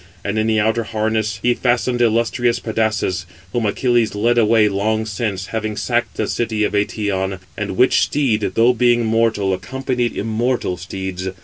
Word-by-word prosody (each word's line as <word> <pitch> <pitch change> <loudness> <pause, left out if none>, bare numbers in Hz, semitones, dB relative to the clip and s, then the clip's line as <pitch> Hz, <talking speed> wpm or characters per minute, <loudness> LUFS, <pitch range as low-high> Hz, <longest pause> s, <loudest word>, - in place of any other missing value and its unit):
And 105 +1 -1
in 110 - +1
the 110 -1 +2
outer 110 +2 +1
harness 110 0 -1
he 125 - +4
fastened 120 0 0
illustrious 120 +1 +2
Pedasus, 110 -7 -1 0.3
whom 115 -3 0
Achilles 120 -1 +1
led 120 +3 +2
away 110 -1 +4
long 110 +2 0
since, 105 -3 -3
having 110 -1 -2
sacked 120 +1 -1
the 110 - 0
city 110 -1 -1
of 105 - 0
Eëtion; 100 -2 -1 0.2
and 105 -4 -4
which 130 - +4
[steed], 115 -9 0
though 120 +2 +5
being 120 0 +2
mortal, 110 -3 +1
accompanied 125 +4 -2
immortal 115 -2 -1
steeds. 95 +1 -5
110 Hz, 155 wpm, -19 LUFS, 105-120 Hz, 0.3 s, though